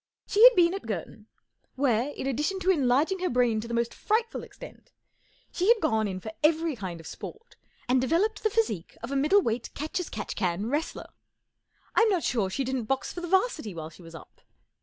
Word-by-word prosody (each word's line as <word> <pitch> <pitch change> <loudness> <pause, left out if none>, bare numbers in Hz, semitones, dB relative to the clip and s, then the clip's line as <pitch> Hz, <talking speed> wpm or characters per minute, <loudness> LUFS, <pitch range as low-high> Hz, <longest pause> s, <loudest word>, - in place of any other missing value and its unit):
She 425 - +3
had - - +9
been 345 0 +4
at 390 -11 -6
Girton, 210 +2 -6 0.5
where, 260 -1 +1
in - - -6
addition 300 +8 -1
to 375 +1 +3
enlarging 295 +4 +2
her 365 - 0
brain 240 -3 +2
to 230 - -7
the 235 - -5
most 235 0 0
frightful 450 +2 -1
extent, - - -13 0.6
she 365 - -1
had 470 0 +6
gone 220 - +1
in 185 -2 -4
for 220 +3 -7
every 320 0 +2
kind 185 -6 -6
of 165 - -13
sport 450 - -9 0.3
and 255 +1 +3
developed 385 - +1
the 435 - +2
physique 420 - -1
of 235 - -5
a - - -1
middle 325 +9 +4
weight 230 +1 -2
catch 305 +5 -3
as 360 - -4
catch 210 - -5
can 185 0 -1
wrestler. 300 +3 -3 0.8
I'm 455 -1 +4
not 370 -5 +1
sure 215 -6 0
she 270 +8 -2
didn't 260 -2 -2
box 270 +4 -2
for 350 - -6
the 350 - -4
'Varsity 345 - 0
while 160 -1 -6
she 170 - -16
was 165 -1 -12
up. - - -14
270 Hz, 210 wpm, -27 LUFS, 220-370 Hz, 0.8 s, had